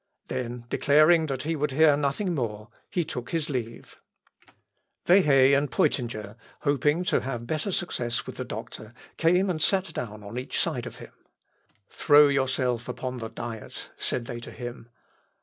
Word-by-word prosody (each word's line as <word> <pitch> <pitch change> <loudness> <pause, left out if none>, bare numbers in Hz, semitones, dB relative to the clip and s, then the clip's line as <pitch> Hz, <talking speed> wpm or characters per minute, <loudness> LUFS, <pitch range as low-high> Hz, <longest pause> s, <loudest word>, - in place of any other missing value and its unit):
Then 120 -1 -4
declaring 155 +5 +4
that 135 -2 -3
he 165 +2 -1
would 150 0 0
hear 150 +2 +5
nothing 150 +7 -1
more, 110 -6 -3 0.2
he 175 -3 -1
took 125 -6 -6
his 160 -3 -2
leave. 115 -3 -5 1.1
Wehe 140 -7 +6
and 140 0 +1
Peutinger, 110 -5 -1 0.2
hoping 145 +4 +2
to - - +1
have 120 -3 -4
better 155 - -2
success 120 -10 -2
with - - -8
the - - -3
doctor, 110 +2 -8 0.2
came 180 +4 +3
and 170 -4 -2
sat 190 0 +2
down 105 -5 -6
on 105 +5 -5
each 130 - -3
side - - -1
of - - -9
him. - - -12 0.7
"Throw 145 0 +5
yourself 130 -3 0
upon 125 0 -4
the 115 -1 -5
Diet," 115 -2 -7
said 120 - -3
they 120 -1 -6
to 120 - -9
him. 120 -1 -8
135 Hz, 160 wpm, -26 LUFS, 120-155 Hz, 1.1 s, Wehe